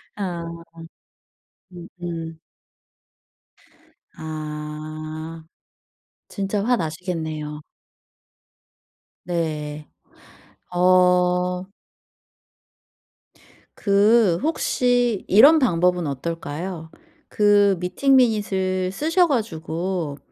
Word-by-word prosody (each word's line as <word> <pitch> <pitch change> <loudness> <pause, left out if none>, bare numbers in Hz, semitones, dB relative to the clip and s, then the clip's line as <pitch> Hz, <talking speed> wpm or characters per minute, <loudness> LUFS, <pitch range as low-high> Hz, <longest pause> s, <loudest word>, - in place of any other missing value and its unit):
아. 180 -4 -4 1.3
음음. 170 -2 -7 1.8
아. 155 +1 -7 0.8
진짜 200 0 -2
화나시겠네요. 160 -7 -3 1.6
네. 155 -3 -3 0.9
어. 180 0 +3 2.1
그 200 -2 +3
혹시 245 - +1
이런 285 - +7
방법은 180 - +2
어떨까요? 160 +3 -5 0.4
그 205 -2 +4
미팅 185 +10 +2
미닛을 190 -6 +1
쓰셔 325 - +2
가지고 170 - -3
180 Hz, 110 characters per minute, -22 LUFS, 160-205 Hz, 2.1 s, 이런